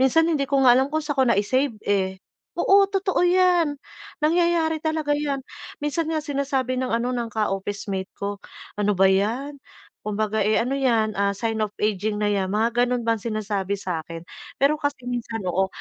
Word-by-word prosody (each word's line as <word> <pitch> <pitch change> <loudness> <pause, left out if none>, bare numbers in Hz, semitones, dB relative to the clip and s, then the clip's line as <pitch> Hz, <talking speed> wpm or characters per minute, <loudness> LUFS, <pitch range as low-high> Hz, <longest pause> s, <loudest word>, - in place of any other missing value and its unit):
minsan 265 +5 +4
hindi 295 -5 0
ko 270 -1 +2
nga 245 - +8
alam 265 +3 +3
kung 310 +1 -2
saan 290 -3 -1
ko - - +5
nai-save, 235 +4 +1
eh. 190 -2 0 0.4
Oo, 395 0 +5
totoo 390 -2 0
'yan. 355 -4 +3 0.5
Nangyayari 330 -1 +2
talaga 315 -2 -1
'yan. 285 -2 -1 0.4
Minsan 320 +2 -1
nga 310 -2 -2
sinasabi 270 -3 -1
ng, 255 - -1
ano, 245 +2 -1
ng 240 -2 -2
ka-officemate 200 -2 -3
ko, 200 0 -4 0.4
"ano 205 -1 +1
ba 195 - +4
'yan? 235 +9 +1 0.5
Kumbaga, 215 +1 -1
eh, 215 +1 +2
ano 270 +3 -1
'yan, 225 -6 +1
ah, 200 0 +1
sign 225 +1 -2
of 210 -1 -2
aging 210 0 0
na 205 - +2
'yan," 195 -2 0
mga 225 +4 0
gano'n 245 -1 -1
bang 230 -1 +1
sinasabi 205 -3 -2
sa 180 -5 -4
'kin. 165 0 -8 0.3
Pero 290 +2 +2
kasi 285 -3 -2
minsan 235 -3 -4
oo, 190 +2 +1
240 Hz, 180 wpm, -24 LUFS, 205-290 Hz, 0.5 s, nga